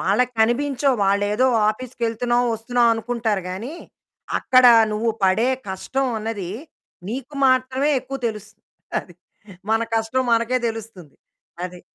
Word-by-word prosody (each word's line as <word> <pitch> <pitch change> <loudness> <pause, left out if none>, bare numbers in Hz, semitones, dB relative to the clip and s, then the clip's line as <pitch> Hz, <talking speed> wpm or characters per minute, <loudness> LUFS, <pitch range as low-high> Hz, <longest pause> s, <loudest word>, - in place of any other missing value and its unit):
వాళ్ళకి 250 +6 +1
కనిపించవు. 265 +3 +2
వాళ్ళేదో 205 +5 +2 0.2
ఆఫీస్‌కెళ్తున్నావు, 240 +1 -1
ఒస్తున్నావు, 235 +1 +2
అనుకుంటారు 225 -3 -2
గానీ, 225 - -6 0.6
అక్కడ 255 -1 +5 0.3
నువ్వు 225 +2 0
పడే 220 +7 +3 0.2
కష్టం 260 +8 -2
అన్నది, 210 -5 -4 0.6
నీకు 270 +4 -6
మాత్రమే 260 +3 +2
ఎక్కువ 270 +1 -6
తెలుసు. 215 -1 -8 0.5
అది. 175 - -17 0.6
మన 225 0 +3
కష్టం 225 +3 0
మనకే 235 +2 +2
తెలుస్తుంది. 220 -9 -8 0.5
అది. 180 -1 -8
230 Hz, 110 wpm, -22 LUFS, 210-255 Hz, 0.6 s, అక్కడ